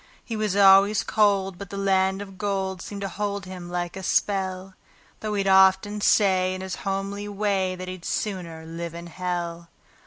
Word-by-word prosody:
He 230 - -4
was 215 -3 -1
always 200 +1 +6
cold, 195 -4 +1
but 200 - -8
the 200 - -6
land 190 0 +1
of 195 -2 -13
gold 190 -2 -2
seemed 200 +1 -7
to 200 - -2
hold 200 -1 -3
him 180 -1 -8
like 175 -1 -3
a 190 - -6
spell; 190 0 -1 0.5
Though 215 -1 -3
he'd 200 -1 0
often 190 +2 +4
say 185 -3 +3
in 185 - -6
his 190 -1 -5
homely 195 +1 -3
way 200 -2 0
that 185 0 -7
he'd 185 -1 -7
"sooner 170 -7 -4
live 165 0 -6
in 170 0 -7
hell". 170 -1 -4
190 Hz, 180 wpm, -25 LUFS, 185-200 Hz, 0.5 s, always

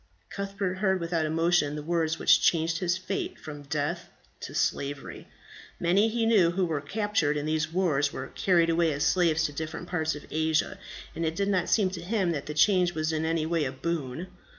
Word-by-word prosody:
Cuthbert 195 -2 -3
heard 190 -2 +2
without 165 -2 -1
emotion 165 -2 +1
the 150 - -5
words 165 0 0
which - - +5
changed 165 0 +2
his 180 -1 0
fate 185 +1 -4
from 150 -2 -8
death 145 0 -3 0.3
to - - -8
slavery. 140 0 -2 0.5
Many, 195 +6 +3
he 230 0 0
knew, 210 -7 +5
who 180 +2 0
were 155 -4 -2
captured 190 -2 0
in 145 - -3
these 155 0 -1
wars 155 -6 +1
were - - -5
carried 170 -3 +3
away 165 -1 +2
as 140 +1 -2
slaves 160 0 +3
to 145 - -1
different 160 +3 -5
parts 160 -3 -1
of 150 - -9
Asia, 160 0 0 0.3
and 165 - -4
it 160 0 -1
did 200 +2 0
not 185 -3 +1
seem 195 -4 +3
to 175 -3 -6
him 190 -1 0
that 145 -4 -4
the 150 - -5
change 180 0 +3
was 155 0 -1
in 160 0 -1
any 160 -1 0
way 165 -1 0
a 130 - -2
boon. 150 +1 -3
165 Hz, 200 wpm, -27 LUFS, 155-185 Hz, 0.5 s, which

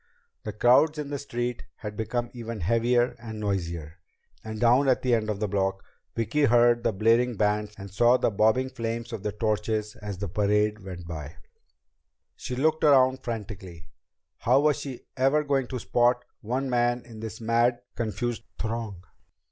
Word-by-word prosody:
The 105 - -3
crowds 125 +9 +4
in 145 -1 -4
the 140 - -2
street 120 -3 -3
had 105 -1 -7
become 120 +2 -2
even 115 -3 -6
heavier 120 +5 +2
and 110 -2 -7
noisier, 85 -5 -3 0.4
and 110 -1 -6
down 125 +4 +4
at 130 - +2
the 125 -2 +2
end 110 -2 +1
of 105 -2 -2
the 105 - 0
block, 95 -1 -1 0.3
Vicki 145 +6 +1
heard 120 -1 +4
the - - +1
blaring 115 +3 +2
bands 105 +1 0
and 100 -1 -9
saw 120 +5 +4
the - - +1
bobbing 110 +6 +2
flames 115 -2 -4
of 105 - -4
the 105 - -2
torches 105 0 -1
as 105 -2 -6
the 100 +2 -4
parade 105 +3 +1
went 90 -3 -8
by. 80 -1 -7 1.0
She 125 - -5
looked 155 +5 +1
around 130 -3 +5
frantically. 95 -8 -7 0.5
How 130 +4 +4
was 150 -1 +2
she 135 -3 -7
ever 135 +4 +3
going 135 -3 0
to 130 - -4
spot 120 +1 +2
one 125 +5 -2
man 120 -1 +1
in 115 -3 -11
this 110 -1 -6
mad, 120 +2 +2
confused 120 +1 -2 0.2
throng? 110 -5 -4
115 Hz, 170 wpm, -27 LUFS, 105-125 Hz, 1.0 s, around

